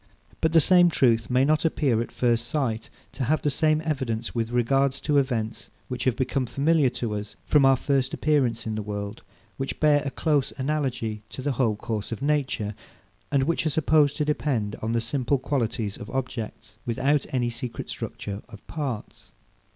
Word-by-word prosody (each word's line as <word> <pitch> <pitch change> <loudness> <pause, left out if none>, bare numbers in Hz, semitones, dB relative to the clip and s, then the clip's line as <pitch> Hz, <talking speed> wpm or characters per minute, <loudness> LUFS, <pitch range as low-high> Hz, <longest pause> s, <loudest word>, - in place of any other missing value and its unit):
But 160 - +2
the 165 - +6
same 175 +2 +6
truth 115 -8 +2
may 130 +2 +3
not 155 +1 +2
appear, 140 -8 +2
at 120 - -5
first 120 -1 +1
sight, 120 -5 -1 0.2
to 130 - -3
have 155 +5 +1
the 145 - +2
same 155 +2 +2
evidence 120 -7 -2
with 115 -1 -1
regard 135 +3 +2
to 145 +1 +2
events, 120 -5 -2 0.2
which 125 -1 -3
have 130 -3 +2
become 130 0 -1
familiar 145 +1 +3
to 115 -3 -3
us 105 0 -5
from 145 -2 +4
our 135 0 +6
first 135 0 0
appearance 130 -7 +1
in 110 - -2
the 110 - -2
world, 100 +1 -5 0.4
which 135 0 -4
bear 150 -1 +4
a 140 - -2
close 145 -1 +1
analogy 130 -6 -2
to 130 - -6
the 145 - 0
whole 120 -4 +1
course 110 -1 -4
of 115 - -3
nature, 135 -8 0 0.6
and 140 -2 +3
which 165 +4 0
are - - +3
supposed 150 -1 +3
to 150 - +1
depend 130 -8 -1
on 110 +1 -1
the 115 - +1
simple 130 +3 +1
qualities 115 -6 -1
of 105 - -9
objects, 115 -4 -5
without 135 +4 +1
any 120 -2 0
secret 120 0 -5
structure 100 0 -5
of 110 -2 -13
parts. 140 -9 -5
130 Hz, 185 wpm, -26 LUFS, 115-145 Hz, 0.6 s, the